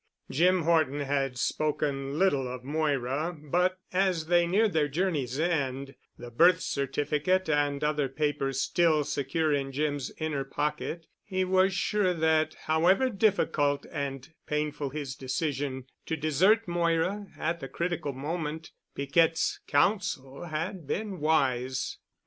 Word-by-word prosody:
Jim 175 +5 +3
Horton 155 -4 +2
had 135 -2 -1
spoken 145 0 -1
little 145 -9 +2
of 125 0 -6
Moira, 145 +2 -1
but 180 +5 +1 0.2
as 185 -3 +1
they 175 +1 +3
neared 205 +4 +2
their 155 -2 +2
journey's 145 -5 -1
end, 140 -5 -1 0.2
the 120 0 -9
birth 170 +8 +5
certificate 150 +6 0
and 145 -1 +1
other 150 -2 +1
papers 135 -2 -1
still 155 0 +2
secure 145 +3 0
in 135 -1 -1
Jim's 145 -1 -2
inner 155 -3 -2
pocket, 150 +4 -3 0.2
he 185 -1 -1
was 185 +1 +3
sure 190 -1 +1
that 160 -1 +2
however 185 +11 +3
difficult 185 -9 +1
and 140 +2 -5
painful 150 -1 -2
his 140 -1 -5
decision 135 -1 -3 0.2
to 160 - -1
desert 180 +9 +3
Moira 175 +4 0
at 170 +2 -1
the 135 - -6
critical 170 -2 -2
moment, 155 +3 -4 0.2
Piquette's 160 +4 +2
counsel 150 -3 0
had 160 +1 -4
been 200 0 -3
wise. 130 -4 0
155 Hz, 130 wpm, -28 LUFS, 140-175 Hz, 0.2 s, birth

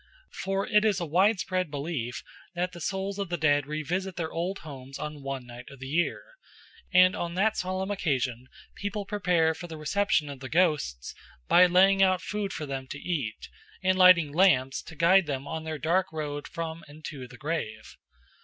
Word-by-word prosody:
For 195 +1 -2
it 210 -1 +3
is 210 -3 +2
a 175 - -2
widespread 185 +1 +1
belief 140 -5 -4 0.3
that 180 +1 -1
the 175 - -10
souls 195 +3 -3
of 200 -3 -3
the 175 - -1
dead 145 -3 +2
revisit 175 +5 -3
their 165 -2 -3
old 180 +4 -2
homes 135 -2 -8
on 150 -1 -6
one 135 -2 -5
night 120 0 -11
of 140 - -12
the 130 - -8
year; 160 +6 0 0.7
and 185 +1 +6
on 170 0 -4
that 215 +4 +2
solemn 185 +2 -2
occasion 130 - -1 0.3
people 205 0 -4
prepare 180 -6 +2
for 175 +2 -8
the 160 -2 -8
reception 195 +1 +1
of 140 -2 -7
the 130 -1 -7
ghosts 150 - +1 0.3
by 180 +1 +7
laying 190 +2 +5
out 185 -1 +4
food 200 +1 -3
for 155 - -4
them 135 -2 -5
to 145 - -6
eat, 145 -9 -3 0.4
and 185 0 +3
lighting 180 -5 +6
lamps 135 -7 +3
to 160 - -12
guide 170 +2 +5
them 135 -2 -3
on 160 0 -5
their 160 -1 -3
dark 180 +5 +1
road 145 -2 -4
from 165 0 -5
and 150 +1 -12
to 135 -4 -7
the 125 0 -13
grave. 115 -9 -4
165 Hz, 190 wpm, -28 LUFS, 145-185 Hz, 0.7 s, by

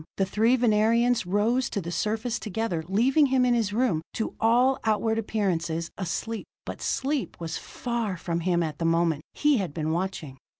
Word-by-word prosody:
The 195 - +2
three 220 +6 +3
Venerians 230 -1 +2
rose 225 +6 +1
to 205 - -2
the 170 -2 -5
surface 220 +5 -1
together, 215 -6 -2
leaving 260 - +3
him 260 -1 +3
in 245 - +3
his 225 -4 +1
room, 220 -8 +1
to 220 - -3
all 245 +4 +3
outward 220 +1 +1
appearances, 170 -6 -1
asleep. 210 +4 -4 0.2
But - - -7
sleep 275 -5 -2
was 165 -1 -4
far 235 -6 -3
from 170 0 -2
him 175 0 +1
at 155 -2 -4
that 165 - -1
moment; 165 -2 +2
he 295 -2 +3
had 185 -8 -3
been 160 -1 -1
watching. 165 -6 -3
215 Hz, 175 wpm, -26 LUFS, 170-235 Hz, 0.2 s, three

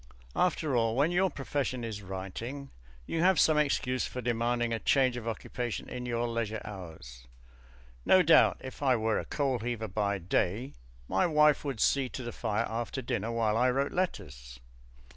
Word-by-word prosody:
After 155 -6 +1
all, 115 -1 +2
when 145 +6 +2
your 190 +2 +2
profession 135 -4 -3
is 110 -3 -5
writing, 100 +9 -6 0.3
you 165 - -2
have 185 0 +4
some 155 -1 +4
excuse 130 -3 0
for 125 - -6
demanding 120 0 0
a 115 - -1
change 130 -1 +3
of 120 -2 -6
occupation 120 +1 -4
in 125 0 -6
your 120 0 -1
leisure 115 -2 -2
hours. 80 - -10 0.8
No 185 -1 +5
doubt 165 0 +5
if 130 +1 -9
I 130 -3 +3
were 110 -1 0
a - - -5
coal 135 -4 -1
heaver 115 -1 -3
by 100 0 -1
day, 95 +7 -1 0.3
my 95 - +2
wife 150 -2 +4
would 135 -6 -4
see 135 +4 +2
to 130 - -6
the 120 - -5
fire 110 -3 -1
after 120 +3 -4
dinner 115 -2 -2
while 115 -2 +1
I 125 +3 +3
wrote 135 +3 0
letters. - - -4
120 Hz, 175 wpm, -30 LUFS, 110-135 Hz, 0.8 s, No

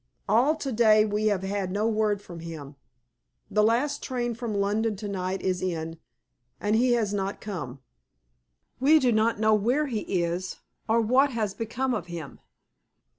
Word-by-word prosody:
All 245 +9 +4
to 280 -4 -4
day 215 -2 +5
we 210 0 0
have 200 -3 +1
had 195 -1 -2
no 210 +3 0
word 215 -2 0
from 175 -3 -9
him. 155 -4 -8 0.8
The 210 - +3
last 235 +7 +1
train 240 -2 -2
from 230 -2 -4
London 210 +2 0
to 205 +1 -6
night 190 -1 -3
is 185 -1 0
in, 165 -3 -3 0.6
and 210 +1 +1
he 245 +2 +3
has 220 -4 0
not 195 0 -2
come. 145 -11 -6 1.0
We 290 +5 +6
do 255 -5 +3
not 220 0 +2
know 220 0 +4
where 240 +8 +2
he 240 -6 -2 0.2
is, 175 +2 -3 0.3
or 225 +1 +4
what 255 +6 +4
has 215 -4 -1
become 245 +4 -2
of 205 -6 -3
him. 170 -5 -8
215 Hz, 170 wpm, -26 LUFS, 190-235 Hz, 1.0 s, We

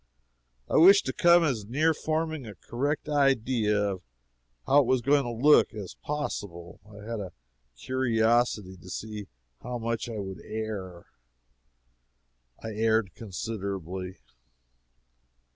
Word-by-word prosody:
I - - +1
wished 195 +5 +7
to 130 - -2
come 175 0 +5
as 120 -10 -1
near 155 +7 +2
forming 155 -3 -2
a 105 - -9
correct 145 - -3
idea 130 -7 +2
of 100 -3 -1 0.6
how 145 - +5
it 130 - -2
was 130 -1 +2
going 140 +2 +3
to - - -3 0.2
look, 150 -6 +6
as 100 -4 -7
possible; 100 - -5
I 105 +1 -11
had 115 -1 -3
a 95 -3 -7 0.4
curiosity 115 - +1
to 90 +1 -14
see 105 0 -6 0.3
how 125 - -4
much 115 0 -3
I 115 - -5
would 95 -2 -6
err. 105 -5 -6 1.6
I 110 - -4
erred 110 -3 +1
considerably. 95 -3 -5
110 Hz, 125 wpm, -28 LUFS, 100-135 Hz, 1.6 s, wished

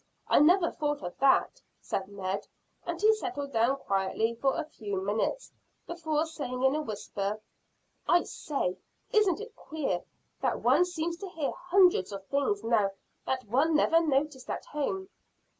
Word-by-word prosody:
I - - +5
never 340 +4 +5
thought 295 -1 -2
of 175 0 -5
that," 270 -1 +3 0.2
said 190 -1 -3
Ned, 195 0 -4 0.4
and 345 -1 -3
he 430 +3 +6
settled 360 -10 -4
down 235 +4 +3
quietly 200 +1 0
for 265 +4 0
a 330 - -2
few 205 -10 -4
minutes, 210 - -1 0.3
before 315 -2 -1
saying 260 -6 -4
in 265 0 +5
a 305 - 0
whisper: 205 -3 -3 0.7
"I 350 - +5
say, 230 -12 -3 0.3
isn't 415 -4 +3
it 445 +1 -9
queer 275 - -3 0.4
that - - 0
one 355 - +5
seems 340 -1 -3
to 390 +1 -7
hear 315 -5 -2
hundreds 360 - +3
of 195 -1 -7
things 280 - 0
now 220 -4 +3 0.4
that 260 -2 -1
one 275 +9 +2
never 325 +2 +5
noticed 280 -3 0
at - - -4
home?" 380 +6 -3
285 Hz, 160 wpm, -29 LUFS, 220-340 Hz, 0.7 s, he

